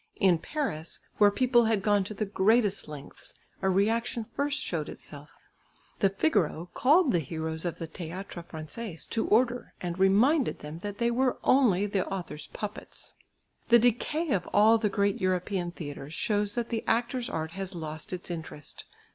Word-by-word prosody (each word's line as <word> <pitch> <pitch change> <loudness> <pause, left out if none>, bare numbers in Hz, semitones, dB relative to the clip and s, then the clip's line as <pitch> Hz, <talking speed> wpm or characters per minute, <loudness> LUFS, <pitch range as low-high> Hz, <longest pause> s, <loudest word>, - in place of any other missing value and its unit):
In 180 -4 +4
Paris, 165 - -3 0.2
where 205 -1 +7
people 240 +2 +3
had 220 -3 +1
gone 205 -2 +3
to 215 - -6
the 215 - -1
greatest 205 +1 +2
lengths, 145 -2 -10 0.3
a 190 - +2
reaction 225 +5 +1
first 285 0 0
showed 165 - -3
itself. 145 +1 -10 0.7
The 195 - +4
Figaro 190 - 0
called 300 +2 +4
the 175 - +3
heroes 160 +2 -4
of 175 - -2
the 165 - -5
Théâtre 175 +2 -7
Français 165 +4 -7
to 225 - 0
order, 245 +2 +2
and 175 0 -4
reminded 235 +10 +4
them 150 +2 -8
that 205 +2 -6
they 235 +1 +1
were 255 +1 +1
only 215 -8 +4
the 200 -2 -1
author's 175 -6 -5
puppets. 210 0 -7 0.6
The 235 - +8
decay 245 +7 +1
of 180 -4 0
all 220 +2 +6
the 215 -2 +1
great 200 +2 0
European 185 0 0
theatres 150 -3 -7
shows 210 -2 0
that 235 -1 -2
the 225 -2 -2
actor's 240 +2 0
art 160 0 -3
has 195 0 -5
lost 155 -2 -6
its 180 -1 -5
interest. 160 -3 -7
200 Hz, 165 wpm, -28 LUFS, 170-235 Hz, 0.7 s, The